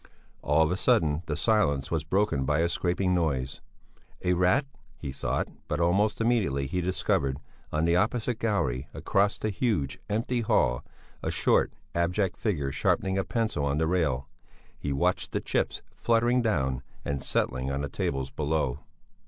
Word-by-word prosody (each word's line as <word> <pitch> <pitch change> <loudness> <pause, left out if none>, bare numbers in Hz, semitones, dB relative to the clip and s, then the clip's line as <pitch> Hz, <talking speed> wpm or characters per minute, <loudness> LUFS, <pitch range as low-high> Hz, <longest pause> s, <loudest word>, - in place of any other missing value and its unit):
All 75 +3 +3
of 80 - +1
a - - +1
sudden 80 -11 +2
the 75 - -1
silence 75 -12 +2
was 80 -2 0
broken 95 -4 +1
by 75 +3 +1
a 85 - +2
scraping 90 +2 0
noise. 70 -7 -1 0.6
A 90 - +3
rat! 90 +10 +3 0.3
he 70 -3 -5
thought, 65 - -1 0.2
but - - -1
almost 95 +5 +2
immediately 110 - +1
he 90 +7 -1
discovered, 70 -6 0 0.3
on 75 +2 +1
the 85 +1 +3
opposite 110 +4 +1
gallery, 70 - 0
across 100 +1 +1
the 110 - -2
huge, 100 - -1
empty 115 +3 0
hall, - - +2 0.4
a - - -2
short, - - +2 0.2
abject 90 +3 +1
figure 75 -11 -1
sharpening 95 +7 +1
a - - +1
pencil 110 -5 -1
on 70 0 +1
the 80 - +2
rail. 75 -6 0 0.5
He 70 - -4
watched 70 - 0
the - - +1
chips - - -1
fluttering 120 +2 +2
down 65 - 0 0.2
and 70 -1 -2
settling 65 +1 0
on 70 0 -1
the 70 - -2
tables 70 -1 -2
below. 75 -4 -1
85 Hz, 160 wpm, -28 LUFS, 70-105 Hz, 0.6 s, All